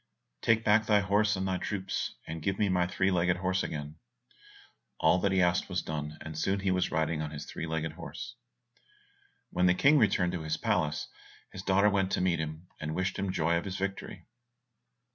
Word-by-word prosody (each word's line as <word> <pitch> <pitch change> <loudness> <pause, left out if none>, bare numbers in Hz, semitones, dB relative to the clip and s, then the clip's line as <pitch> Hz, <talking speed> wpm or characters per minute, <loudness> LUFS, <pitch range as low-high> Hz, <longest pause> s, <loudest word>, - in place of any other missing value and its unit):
"Take 115 -1 +3
back 110 +1 +4
thy 105 -1 +5
horse 100 +2 +2
and 95 0 -2
thy 95 -1 -1
troops, 95 -2 -3
and 80 0 -6
give 95 +3 -1
me 105 -2 +2
my 90 -1 +2
three 95 +2 +1
legged 90 0 +2
horse 95 +1 0
again." 75 0 -5 1.0
All 80 +3 +4
that 100 +1 +1
he 95 -1 +3
asked 85 0 +1
was - - -1
done, 75 0 -4
and 80 -1 -7
soon 95 +5 0
he 95 -1 +1
was 90 -1 +1
riding 80 0 0
on 75 - -3
his 75 -1 -7
three 80 - -5
legged 80 0 -2
horse. 80 - -8 1.2
When 90 0 +2
the 90 - +4
King 140 +8 +5
returned 95 -5 +3
to 90 -2 -3
his 80 0 -2
palace, 80 -1 0 0.4
his 95 - -7
daughter 100 +2 +3
went 95 -1 +1
to - - +1
meet 90 -3 +2
him, 80 +2 -5
and 80 0 -4
wished 95 +1 -1
him 95 -1 -1
joy 85 -1 +1
of 85 - -3
his 95 -1 -4
victory. 100 0 -4
90 Hz, 200 wpm, -30 LUFS, 80-95 Hz, 1.2 s, thy